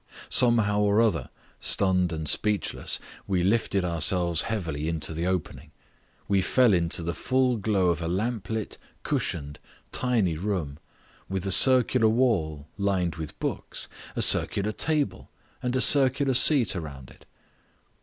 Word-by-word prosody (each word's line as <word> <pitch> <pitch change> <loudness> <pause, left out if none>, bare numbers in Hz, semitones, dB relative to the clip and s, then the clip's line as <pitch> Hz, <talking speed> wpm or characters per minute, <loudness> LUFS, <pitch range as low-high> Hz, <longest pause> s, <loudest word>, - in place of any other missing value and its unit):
Somehow 115 -4 +5
or 105 +1 +2
other, 110 -7 0 0.3
stunned 90 -3 +2
and 80 -1 -5
speechless, 105 +7 0 0.3
we 95 -3 -1
lifted 100 -1 0
ourselves 85 0 0
heavily 80 -8 -4
into 80 -1 -5
the 85 +3 -3
opening. 90 -3 -4 0.6
We 100 -1 +1
fell 125 +2 +2
into 85 -1 -1
the 85 +1 -3
full 130 - 0
glow 100 -4 0
of 85 -1 -2
a 85 - -4
lamp 105 +5 -3
lit, 110 -2 -5 0.2
cushioned, 75 -2 -4 0.3
tiny 115 -10 0
room, 85 -6 -4 0.5
with 95 0 -4
a 95 - -2
circular 125 0 +5
wall 90 - -1
lined 95 -5 -1
with 80 -2 -8
books, - - -5 0.3
a - - +2
circular 100 +1 +2
table, 150 +5 -2 0.3
and 125 -1 -3
a 130 - +1
circular 135 0 +4
seat 125 -4 +5
around 70 -7 -9
it. - - -20
95 Hz, 140 wpm, -25 LUFS, 85-115 Hz, 0.6 s, Somehow